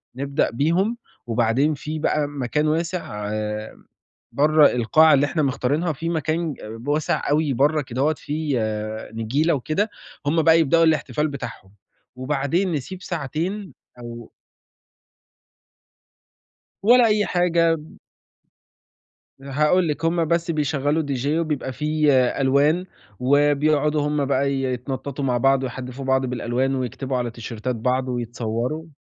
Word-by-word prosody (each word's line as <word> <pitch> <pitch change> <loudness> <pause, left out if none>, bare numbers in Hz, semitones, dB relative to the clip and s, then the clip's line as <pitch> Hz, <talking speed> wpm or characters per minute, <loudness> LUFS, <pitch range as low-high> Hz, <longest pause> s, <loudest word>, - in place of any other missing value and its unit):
نبدأ 140 +3 0
بيهم، 170 - +1 0.3
وبعدين 120 +6 +2
في 155 +2 -5
بقى 150 -1 +1
م 145 -1 -7
مكان 150 +5 0
واسع 160 - -2 1.0
برّا 150 +1 +5
القاعة 155 +7 +4
اللي 140 0 +4
إحنا 155 +2 -1
مختارينها 140 +5 0
في 165 +4 -4
مكان 160 0 -1 0.2
ب 120 +4 -11
واسع 150 +1 0
أوي 150 -1 +2
برّا 150 +5 +2
كدهوّة 135 +3 0
فيه 150 -3 -2 0.5
نجيلة 130 +9 0
وكده، 155 - -1 0.4
هُم 160 +3 +2
بقى 160 +1 +5
يبدأوا 165 +1 +4
الإحتفال 155 -1 +1
بتاعهم، 115 -9 -8 0.4
وبعدين 145 +8 -1
نسيب 165 +5 -4
ساعتين 175 +5 -4 0.3
أو 120 -1 -9 2.5
ولا 240 +4 +6
أي 210 -1 +2
حاجة. 170 -2 +2 1.6
هاقول 150 +6 +2
لِك، 150 +2 -3
هُم 165 0 +2
بس 170 +1 0
بيشغّلوا 150 0 0
DJ 140 -2 -3
وبيبقى 150 -5 -2
في 150 +2 +1 0.3
ألوان، 145 +6 +3 0.4
وبيقعدوا 145 +2 +2
هُم 150 -1 0
بقى 140 0 +1
يتنططوا 135 +1 -3
مع 125 -2 +1
بعض 135 +1 +3
ويحدّفوا 130 +1 -6
بعض 130 0 +1
بالألوان 125 +2 -1
ويكتبوا 130 +1 -3
على 120 -1 -1
تيشيرتات 115 +1 -5
بعض 125 +3 0
ويتصوروا. 120 +5 -3
145 Hz, 120 wpm, -22 LUFS, 130-160 Hz, 2.5 s, ولا